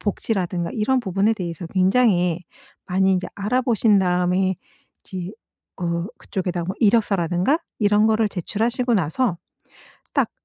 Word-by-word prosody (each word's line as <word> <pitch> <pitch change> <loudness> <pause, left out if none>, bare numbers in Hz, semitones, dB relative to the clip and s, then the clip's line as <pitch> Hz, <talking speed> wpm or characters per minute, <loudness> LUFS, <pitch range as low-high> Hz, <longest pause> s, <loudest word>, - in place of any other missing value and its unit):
복지라든가 185 -5 -2
이런 255 +4 +1
부분에 200 0 +1
대해서 175 -3 -5
굉장히 185 -2 +2 0.4
많이 190 +1 +2
인제 180 -1 -1
알아보신 220 0 +2
다음에 180 +1 +1 0.5
이제 185 0 -7 0.5
어 170 0 -1
그쪽에다가 180 -4 -3
뭐 190 - -4
이력서라든가 200 - +2 0.2
이런 210 +1 +4
거를 220 0 +2
제출하시고 230 +6 -1
나서 185 - 0 0.7
딱 - - +1
190 Hz, 310 characters per minute, -22 LUFS, 180-220 Hz, 0.7 s, 이런